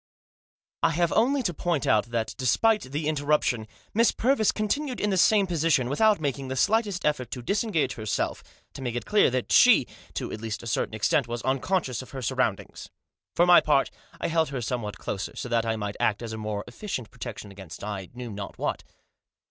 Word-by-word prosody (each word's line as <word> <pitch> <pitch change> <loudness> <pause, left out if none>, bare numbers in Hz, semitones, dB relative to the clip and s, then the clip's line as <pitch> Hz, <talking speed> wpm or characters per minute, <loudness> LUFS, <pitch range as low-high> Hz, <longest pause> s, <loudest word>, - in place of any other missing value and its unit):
I 165 - +4
HAVE 170 +1 +1
only 270 +3 +2
to 175 - -1
point 165 -4 -1
out 110 +1 +3
that, 115 -1 -2
despite 210 - +2
the 150 +1 -2
interrup 150 0 +1
tion, 110 -3 -1 0.3
Miss 230 +2 +4
Purvis 240 -3 +2
continued 250 +6 -2
in 205 - 0
the - - +1
same 205 +2 +5
position, 160 -7 +1
without 210 +8 +3
making 140 -3 -2
the 130 - -3
slightest 205 - +1
effort 135 -5 0
to 125 -1 -6
disengage 200 - 0
her 110 -1 -7
self, 100 - -1 0.3
to - - -9
make 120 -2 -3
it 120 - -3
clear 210 0 +4
that 130 -1 -2
she, - - +7 0.3
to - - -3
at 110 - -6
least 110 -1 -4
a - - -9
certain 110 -1 -1
extent, 115 +4 +1
was 120 0 -4
unconscious 130 - 0
of 130 - -12
her 135 - -6
surroundings. - - -2 0.5
For 175 - +5
my 175 -1 +8
part 145 -3 +2 0.3
I - - -1
held 160 -2 +1
her 135 -2 -3
somewhat 110 -4 -3
closer, 95 - -5
so - - -5
that 115 -1 +1
I 115 - +1
might 105 -2 -4
act 105 +2 +1
as 115 -1 -5
a - - -5
more 105 -1 -3
efficient 125 - -6
protection 115 -4 -8
against 95 -5 -10
I 100 -3 -5
knew 120 -2 -6
not 100 -1 -7
what. - - -2
130 Hz, 205 wpm, -26 LUFS, 115-175 Hz, 0.5 s, my